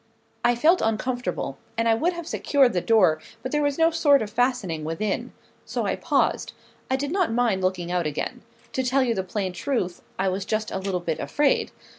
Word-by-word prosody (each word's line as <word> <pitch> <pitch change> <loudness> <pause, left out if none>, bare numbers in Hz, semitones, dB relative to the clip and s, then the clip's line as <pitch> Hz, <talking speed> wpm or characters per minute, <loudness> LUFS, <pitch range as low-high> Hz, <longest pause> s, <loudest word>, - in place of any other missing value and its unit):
I 240 - +4
felt 325 +9 +4
uncomfortable; 225 - -2 0.2
and 230 0 +1
I 225 - +5
would 330 +11 +1
have 340 -1 -6
secured 275 -5 +2
the 180 - +1
door, 180 -9 +4 0.2
but 255 - -4
there 295 - +1
was 285 -1 0
no 325 0 +4
sort 290 -5 +4
of 210 - -7
fastening 225 -10 0
within. 165 +6 -2 0.3
So - - -3
I - - 0
paused. - - 0 0.4
I 260 - +2
did 285 +2 -2
not 370 -7 +1
mind 225 -5 +1
looking 180 -2 -1
out 175 -3 0
again. 150 0 -4 0.3
To 260 - 0
tell 260 +1 +2
you 240 -2 +1
the 190 - -1
plain 190 0 -3
truth, 180 -2 -2 0.2
I 190 - 0
was 190 +1 -1
just 215 +2 -2
a 190 - -2
little 190 -2 -2
bit 165 -2 -2
afraid. 290 -1 +1
225 Hz, 205 wpm, -25 LUFS, 185-270 Hz, 0.4 s, I